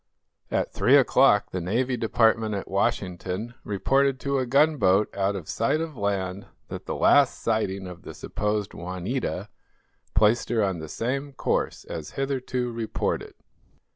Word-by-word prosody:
At - - -1
three 135 +4 +5
o'clock 130 -5 +4
the 90 - -3
Navy 125 +9 0
Department 110 -1 +2
at 100 - -4
Washington 95 +2 -2
reported 135 +7 +1
to 140 -1 0
a 130 - -1
gunboat 120 -8 +3
out 100 0 0
of 90 -6 -6
sight 115 +7 0
of 160 -2 -4
land 100 -3 -2 0.2
that - - -7
the - - -2
last 140 -3 +4
sighting 100 -4 -1
of 90 -1 -9
the - - -9
supposed 105 -1 -2
"Juanita" 90 +1 -3 0.7
placed 110 +4 +3
her 115 -3 +2
on 95 -4 -1
the 80 -1 -7
same 135 - -3
course - - -1
as 80 -2 -7
hitherto 130 -2 -2
reported. 115 -1 -3
110 Hz, 145 wpm, -26 LUFS, 95-130 Hz, 0.7 s, three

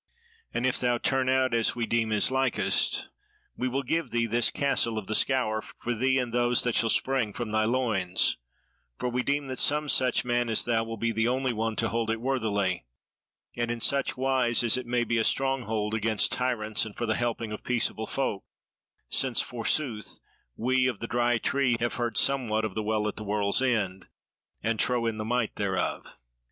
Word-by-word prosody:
And 120 - -1
if 130 - +2
thou 120 -1 +1
turn 130 +1 0
out 130 -1 +2
as 115 -1 +2
we 120 -1 -1
deem 115 -1 0
is 105 +3 +2
likest, 130 0 +1 0.5
we 130 - -2
will 135 +2 -1
give 165 +6 -1
thee 115 0 +1
this 120 +1 +2
Castle 125 -5 +1
of 105 - -4
the 110 - -3
Scaur, 110 -3 +1
for 120 +3 -5
thee 130 +4 +2
and 125 -3 -1
those 120 0 +2
that 120 - +1
shall 115 +1 +2
spring 130 -4 +1
from 120 -1 -4
thy 110 0 +2
loins; 110 -7 +1 0.6
for 125 - -2
we 125 +1 0
deem 140 +2 0
that 130 -1 -5
some 150 +1 +2
such 130 -4 +2
man 120 -1 0
as 110 - +2
thou 115 -1 +1
will 115 0 -6
be 115 +2 0
the 115 +1 +1
only 130 0 0
one 110 0 -2
to 115 - +1
hold 115 -1 -1
it 115 0 -1
worthily, 105 - -1 0.7
and 120 -1 -1
in 120 0 -2
such 140 +3 +1
wise 130 -3 +2
as 115 - +3
it 130 -1 -4
may 120 0 +1
be 115 -1 0
a - - +2
stronghold 110 -5 0
against 110 -1 +1
tyrants 115 -4 0
and 110 -2 -7
for 120 - -2
the 110 - +1
helping 115 -1 -2
of 105 - -6
peaceable 115 -2 0
folk; 120 -8 -2 0.6
since 130 -3 +1
forsooth, 120 -1 -1 0.4
we 130 +2 +2
of 120 -6 -2
the - - -4
Dry 120 0 +1
Tree 130 0 +1
have 120 0 -1
heard 120 -2 -1
somewhat 115 -6 +2
of - - -4
the 110 - -2
Well 105 0 0
at 105 - -4
the 110 - -5
World's 100 +1 +1
End, 105 -8 0 0.6
and 110 0 0
trow 125 -2 +1
in 115 -1 -1
the 110 - -3
might 120 -1 -1
thereof." 95 -3 -2
120 Hz, 200 wpm, -27 LUFS, 110-130 Hz, 0.7 s, as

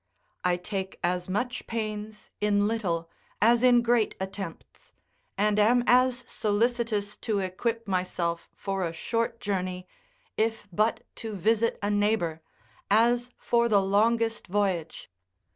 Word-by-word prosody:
I 180 -1 +2
take 190 +1 -5
as 180 +1 -1
much 245 +6 -2
pains 215 -1 -5
in 205 -1 +3
little 180 -7 -1 0.3
as 235 +3 +4
in 245 -1 +5
great 235 -2 +2
attempts, 190 -2 -7 0.4
and 210 +1 +2
am 240 +4 +4
as 250 0 +4
solicitous 215 -1 0
to 215 -3 -1
equip 215 +4 -2
myself 180 -3 -2
for 195 -1 -3
a 165 -1 -2
short 230 +7 -2
journey, 185 -2 -3 0.5
if 220 -1 0
but 220 +4 +1
to 225 -2 -5
visit 225 +4 +2
a 205 - +1
neighbour, 205 -6 +1 0.5
as 240 +4 +3
for 235 0 +2
the 205 -2 +5
longest 225 +3 +1
voyage. 185 -4 -1
210 Hz, 125 wpm, -27 LUFS, 190-230 Hz, 0.5 s, in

